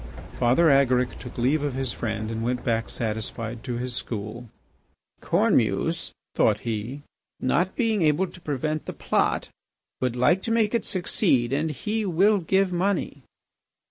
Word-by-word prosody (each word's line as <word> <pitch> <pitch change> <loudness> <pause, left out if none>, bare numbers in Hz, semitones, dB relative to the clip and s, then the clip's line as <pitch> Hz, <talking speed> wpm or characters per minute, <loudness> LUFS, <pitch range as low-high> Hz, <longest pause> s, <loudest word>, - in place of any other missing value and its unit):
Father 130 +7 +4
Agaric 130 -2 +3
took 125 - -10
leave 135 +5 +2
of 145 -3 -2
his 130 -2 -2
friend 110 -1 -3
and 115 0 -3
went 125 +1 -1
back 115 -1 0
satisfied 110 +1 -4
to 125 -3 -3
his 125 +1 -4
school. 115 0 -5 0.7
"Cornemuse," - - +1 0.2
thought 105 -1 +2
he, 115 +5 -4 0.4
"not 175 +8 +1
being 225 -4 +1
able 155 +3 +3
to 185 0 -13
prevent 155 +1 -2
the - - -4
plot, - - 0 0.5
would 125 -2 -1
like 150 +10 +3
to 225 - -3
make 225 -1 +2
it 235 - 0
succeed 135 - +1
and 155 +3 0
he 210 - -2
will 195 +3 +3
give 190 +2 +1
money." 180 -5 -1
135 Hz, 150 wpm, -25 LUFS, 120-180 Hz, 0.7 s, Father